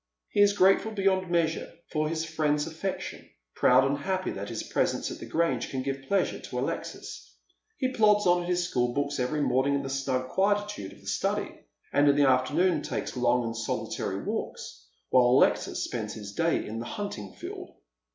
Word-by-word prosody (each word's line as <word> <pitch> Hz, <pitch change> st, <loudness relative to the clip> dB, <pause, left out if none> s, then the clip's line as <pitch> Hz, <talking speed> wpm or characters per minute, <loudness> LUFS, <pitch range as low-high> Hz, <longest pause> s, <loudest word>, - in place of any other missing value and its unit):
He 205 Hz, -, +2 dB
is 205 Hz, 0 st, +5 dB
grateful 195 Hz, +3 st, +4 dB
beyond 190 Hz, -3 st, +1 dB
measure 165 Hz, -2 st, 0 dB, 0.2 s
for 155 Hz, -1 st, 0 dB
his 165 Hz, 0 st, -2 dB
friend's 150 Hz, -2 st, 0 dB
afEection, 165 Hz, +4 st, -5 dB, 0.2 s
proud 130 Hz, +1 st, +5 dB
and 140 Hz, +1 st, 0 dB
happy 185 Hz, +4 st, -1 dB
that 100 Hz, +1 st, -5 dB
his -, -, -4 dB
presence -, -, 0 dB
at -, -, -7 dB
the -, -, -8 dB
Grange 160 Hz, -8 st, 0 dB
can 130 Hz, -1 st, -3 dB
give 135 Hz, 0 st, -4 dB
pleasure 200 Hz, -, +1 dB
to -, -, -7 dB
Alexis. -, -, -5 dB, 0.4 s
He 260 Hz, -1 st, -1 dB
plods 210 Hz, -3 st, +4 dB
on 175 Hz, 0 st, +4 dB
at 175 Hz, -, -5 dB
his 175 Hz, -1 st, +1 dB
schopl 120 Hz, -6 st, 0 dB
books 145 Hz, 0 st, -1 dB
every 145 Hz, +4 st, 0 dB
morning 135 Hz, +1 st, +2 dB
in 140 Hz, -, -1 dB
the 135 Hz, -, -4 dB
snug 130 Hz, -1 st, -1 dB
quietude 205 Hz, -, 0 dB
of -, -, -18 dB
the -, -, -19 dB
study, -, -, -1 dB, 0.4 s
and 145 Hz, 0 st, +5 dB
in 140 Hz, -, +4 dB
the 145 Hz, -1 st, +4 dB
afternoon 150 Hz, +6 st, +3 dB
takes -, -, -4 dB
long 125 Hz, 0 st, +2 dB
and 115 Hz, 0 st, -3 dB
solitary 115 Hz, 0 st, -3 dB
walks, -, -, -5 dB, 0.2 s
while 125 Hz, -1 st, +6 dB
Alexis 125 Hz, +2 st, +3 dB
spends 110 Hz, -3 st, -4 dB
his 100 Hz, -2 st, -8 dB
day 165 Hz, +5 st, +1 dB
in 110 Hz, +1 st, -5 dB
the 115 Hz, -, -5 dB
hunting 120 Hz, -, -5 dB
field. -, -, -8 dB
145 Hz, 190 wpm, -28 LUFS, 130-180 Hz, 0.4 s, while